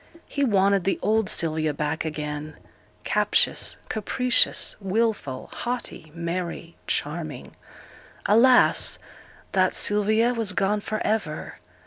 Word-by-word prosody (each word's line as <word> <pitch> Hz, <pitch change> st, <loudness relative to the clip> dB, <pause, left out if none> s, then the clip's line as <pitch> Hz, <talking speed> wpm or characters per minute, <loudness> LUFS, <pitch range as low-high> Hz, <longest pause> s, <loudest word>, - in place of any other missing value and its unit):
He 285 Hz, -, -2 dB
wanted 200 Hz, -5 st, +3 dB
the 195 Hz, -, 0 dB
old 220 Hz, -1 st, +2 dB
Sylvia 155 Hz, -5 st, 0 dB
back 150 Hz, +2 st, -2 dB
again; 150 Hz, 0 st, -5 dB, 0.5 s
captious, -, -, +1 dB
capricious, 250 Hz, +3 st, +1 dB
wilful, 195 Hz, -, -1 dB
haughty, 240 Hz, -10 st, -5 dB
merry, 170 Hz, 0 st, -4 dB
charming. 150 Hz, -3 st, -3 dB, 0.7 s
Alas! 245 Hz, +4 st, +5 dB, 0.5 s
that 185 Hz, -1 st, +2 dB
Sylvia 215 Hz, +3 st, +2 dB
was 225 Hz, -5 st, -1 dB
gone 200 Hz, +2 st, +1 dB
for 215 Hz, +1 st, -3 dB
ever. 190 Hz, -9 st, -2 dB
195 Hz, 100 wpm, -25 LUFS, 155-220 Hz, 0.7 s, Alas